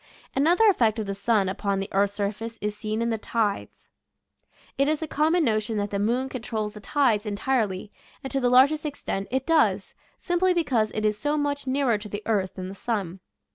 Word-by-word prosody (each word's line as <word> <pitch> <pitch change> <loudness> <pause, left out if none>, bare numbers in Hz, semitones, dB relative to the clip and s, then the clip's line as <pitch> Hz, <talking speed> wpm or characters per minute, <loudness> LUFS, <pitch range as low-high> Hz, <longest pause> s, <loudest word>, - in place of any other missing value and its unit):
Another 345 +11 +4
effect 235 - +3
of 220 - -2
the 200 - -3
sun 200 0 +1
upon 195 +1 -1
the 195 - -3
earth's 200 +1 +2
surface 215 +3 -3
is 210 0 -3
seen 215 +1 -2
in 235 - 0
the 225 - -1
tides. 215 -2 -3 0.8
It 275 - +2
is 310 +1 0
a - - -3
common 315 +4 +2
notion 215 -1 0
that 205 0 -2
the 200 - -1
moon 240 +6 +1
controls 220 -5 -4
the 210 - -9
tides 225 -2 +1
en 205 - -2
tirely, 210 -5 -1 0.3
and 270 - -5
to 275 - 0
the 250 -2 +2
largest 275 +5 +5
extent 275 -9 -4
it 265 +1 -1
does, 325 -2 +2 0.2
simply 360 0 +1
because 250 -10 +1
it 215 - -1
is 210 0 +1
so 295 +6 0
much 285 -1 -2
nearer 260 -5 +1
to 210 0 -9
the 205 +1 -5
earth 200 -4 0
than 185 -1 -5
the 190 - -7
sun. 195 -4 -3
225 Hz, 210 wpm, -25 LUFS, 205-275 Hz, 0.8 s, largest